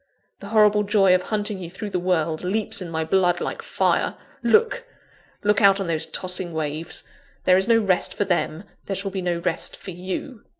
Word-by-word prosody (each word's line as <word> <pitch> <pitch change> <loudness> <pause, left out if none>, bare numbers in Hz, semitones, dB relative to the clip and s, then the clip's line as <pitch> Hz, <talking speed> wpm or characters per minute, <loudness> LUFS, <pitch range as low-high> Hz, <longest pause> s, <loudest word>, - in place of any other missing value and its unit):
The 200 - -9
horrible 210 -1 +4
joy 200 -2 +4
of 185 - +3
hunting 210 0 -2
you 175 -2 -7
through 205 +3 -7
the 180 - 0
world, 165 -3 0
leaps 200 +2 -1
in 180 - -5
my 160 -1 -1
blood 175 +1 +2
like - - -4
fire! - - 0 0.3
Look! 455 - +3 0.6
look 210 +1 +3
out 200 -1 +6
on 195 - -2
those 165 -2 -1
tossing 180 -1 -1
waves. 155 +1 -3 0.4
There 185 - +5
is 190 +2 +2
no 230 -1 +5
rest 195 -5 +1
for 205 - 0
them; 175 -2 -1 0.2
there 195 - -2
shall 195 +1 -3
be 190 0 -3
no 175 -1 -1
rest 170 0 -2
for 190 - -8
_you! 185 +8 -5
185 Hz, 200 wpm, -23 LUFS, 175-205 Hz, 0.6 s, out